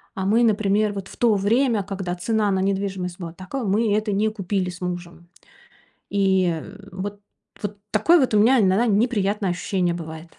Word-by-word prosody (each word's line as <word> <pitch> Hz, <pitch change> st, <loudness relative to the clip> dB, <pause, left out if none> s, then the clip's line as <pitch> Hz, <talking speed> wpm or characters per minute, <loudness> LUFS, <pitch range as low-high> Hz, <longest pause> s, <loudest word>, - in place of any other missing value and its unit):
А 190 Hz, -, -3 dB
мы, 225 Hz, +5 st, +3 dB
например, 210 Hz, -1 st, +2 dB
вот 195 Hz, -1 st, -6 dB
в -, -, -13 dB
то 230 Hz, -3 st, +3 dB
время, 220 Hz, +2 st, +2 dB
когда 190 Hz, -2 st, -4 dB
цена 210 Hz, +3 st, 0 dB
на 190 Hz, -, +1 dB
недвижимость 190 Hz, -2 st, -2 dB
была 165 Hz, -2 st, -6 dB
тако 190 Hz, +9 st, -6 dB
мы 205 Hz, +2 st, +1 dB
это 215 Hz, 0 st, -1 dB
не 215 Hz, +2 st, +1 dB
купили 195 Hz, -3 st, -2 dB
с 180 Hz, +1 st, -10 dB
мужем. 175 Hz, -1 st, -6 dB, 0.8 s
И 190 Hz, -5 st, +1 dB, 0.3 s
вот 200 Hz, +2 st, -6 dB, 0.4 s
вот 205 Hz, 0 st, -4 dB
такое 320 Hz, +11 st, +4 dB
вот 255 Hz, -4 st, +1 dB
у -, -, +5 dB
меня 245 Hz, +5 st, +5 dB
иногда 195 Hz, +4 st, +3 dB
неприятное 205 Hz, -3 st, +1 dB
ощущение 175 Hz, -1 st, -1 dB
бывает. 160 Hz, 0 st, -9 dB
200 Hz, 175 wpm, -23 LUFS, 185-215 Hz, 0.8 s, у